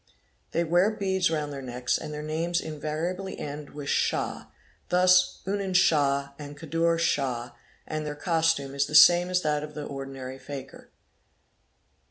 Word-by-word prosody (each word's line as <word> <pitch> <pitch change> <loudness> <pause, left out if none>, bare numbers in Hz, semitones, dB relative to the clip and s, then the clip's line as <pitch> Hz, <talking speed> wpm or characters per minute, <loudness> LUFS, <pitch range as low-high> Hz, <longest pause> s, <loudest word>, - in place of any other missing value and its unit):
They 170 - 0
wear 175 +4 +3
beads 190 -4 0
round 150 -3 -2
their 135 - -6
necks, 125 -1 -2
and - - -4
their 150 0 -5
names 165 +3 -1
invariably 160 +5 -4
end 145 0 -6
with 145 -1 -7
'Shah' - - -1 0.4
thus 180 0 +4
'Unen 195 -1 -2
Shah' 145 -6 +3
and 145 0 -8
'Kadur 165 +2 0
Shah,' 130 -7 -1 0.3
and 155 0 -4
their 150 -1 -4
costume 160 -4 0
is 140 0 0
the 150 - -4
same 175 +3 +8
as. 180 0 +1
that 150 -1 +1
of 150 -1 -8
the 150 - -5
ordinary 135 -1 -7
fakir. 135 -2 -9
155 Hz, 155 wpm, -27 LUFS, 140-175 Hz, 0.4 s, same